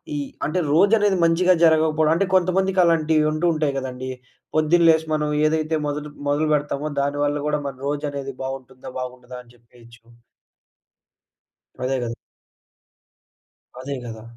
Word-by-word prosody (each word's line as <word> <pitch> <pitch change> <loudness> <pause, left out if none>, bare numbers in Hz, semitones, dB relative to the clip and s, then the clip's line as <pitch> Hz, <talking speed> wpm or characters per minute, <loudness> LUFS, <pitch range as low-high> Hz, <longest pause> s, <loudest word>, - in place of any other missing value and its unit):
ఈ - - -2 0.3
అంటే 170 +5 -1
రోజనేది 205 +2 +4
మంచిగా 180 +2 +4
జరగకపోడం, 155 -1 +3
అంటే 195 - +1
కొంతమందికి 185 +1 +2
అలాంటివుంటూ 155 -1 +2
ఉంటాయి 150 -3 -1
గదండీ! 130 0 -6 0.4
పొద్దున్న 165 +2 +4
లేసి 160 0 +3
మనం 150 -1 0 0.2
ఏదైతే 155 0 0
మొదట 150 +1 -4 0.2
మొదలుపెడతామో 150 0 0
దానివల్ల 145 +1 0
గూడా 150 0 0
మన 135 - -6
రోజనేది 140 -2 -3
బావుంటుందా? 130 -1 -7
బాగుండదా? 125 0 -8
అని 120 -1 -21
జెప్పేయొచ్చు. 115 -1 -20 1.8
అదే 130 +1 0
గదా! 115 -1 -3 1.7
అదే 140 +1 -4
గదా! 110 -1 -8
150 Hz, 115 wpm, -22 LUFS, 135-160 Hz, 1.8 s, రోజనేది